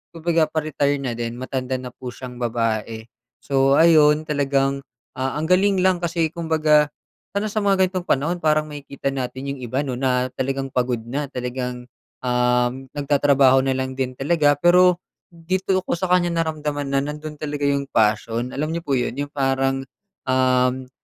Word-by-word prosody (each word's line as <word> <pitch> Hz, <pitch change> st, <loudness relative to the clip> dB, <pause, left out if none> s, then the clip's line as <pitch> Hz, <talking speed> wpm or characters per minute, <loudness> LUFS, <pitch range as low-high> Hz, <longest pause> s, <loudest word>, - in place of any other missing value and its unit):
kumbaga 165 Hz, -1 st, +1 dB
pa-retire 150 Hz, -2 st, 0 dB
na 125 Hz, -, -2 dB
din. 115 Hz, 0 st, -4 dB
Matanda 130 Hz, 0 st, -3 dB
na 125 Hz, -1 st, -6 dB
po 125 Hz, -, -10 dB
siyang 125 Hz, 0 st, -8 dB
babae. 115 Hz, -1 st, -2 dB, 0.4 s
So 135 Hz, 0 st, +3 dB
ayun, 155 Hz, -1 st, +5 dB
talagang, 140 Hz, -2 st, 0 dB, 0.4 s
ah, 135 Hz, +2 st, -1 dB
ang 155 Hz, +1 st, -2 dB
galing 195 Hz, +1 st, +4 dB
lang 185 Hz, -2 st, +3 dB
kasi 165 Hz, -1 st, 0 dB
kumbaga 155 Hz, -3 st, +2 dB, 0.5 s
lalo 210 Hz, -, 0 dB
na 210 Hz, -, -4 dB
sa 215 Hz, -, 0 dB
mga 195 Hz, -2 st, +3 dB
ganitong 185 Hz, -1 st, -4 dB
panahon 150 Hz, +6 st, +1 dB
parang 155 Hz, 0 st, +2 dB
makikita 140 Hz, -2 st, -5 dB
natin 130 Hz, 0 st, -4 dB
'yung 135 Hz, -, -10 dB
iba, 130 Hz, +4 st, -2 dB
'no, 130 Hz, -, -3 dB
na 125 Hz, 0 st, +1 dB
talagang 135 Hz, 0 st, -3 dB
pagod 125 Hz, -1 st, 0 dB
na 140 Hz, +3 st, -3 dB
talagang, 125 Hz, -1 st, -4 dB, 0.4 s
uhm, 125 Hz, +1 st, +1 dB
nagtatrabaho 140 Hz, -2 st, +4 dB
na 130 Hz, 0 st, 0 dB
lang 130 Hz, 0 st, -3 dB
din 130 Hz, -1 st, -3 dB
talaga. 145 Hz, 0 st, +2 dB
Pero 180 Hz, +2 st, +5 dB, 0.3 s
dito 185 Hz, +3 st, -1 dB
ko -, -, -1 dB
sa 180 Hz, +1 st, -2 dB
kanya 175 Hz, -1 st, +3 dB
naramdaman 150 Hz, -3 st, -2 dB
na 140 Hz, -, +1 dB
nando'n 150 Hz, +2 st, -4 dB
talaga 145 Hz, -1 st, -5 dB
'yung 140 Hz, -1 st, +1 dB
passion. 115 Hz, +3 st, +1 dB
Alam 155 Hz, +2 st, -1 dB
n'yo 170 Hz, -, -3 dB
po 140 Hz, -5 st, 0 dB
yon, 125 Hz, -, -1 dB
'yung 145 Hz, -, -4 dB
parang, 135 Hz, -1 st, 0 dB, 0.4 s
uhm, 130 Hz, 0 st, +1 dB
140 Hz, 170 wpm, -22 LUFS, 130-155 Hz, 0.5 s, ayun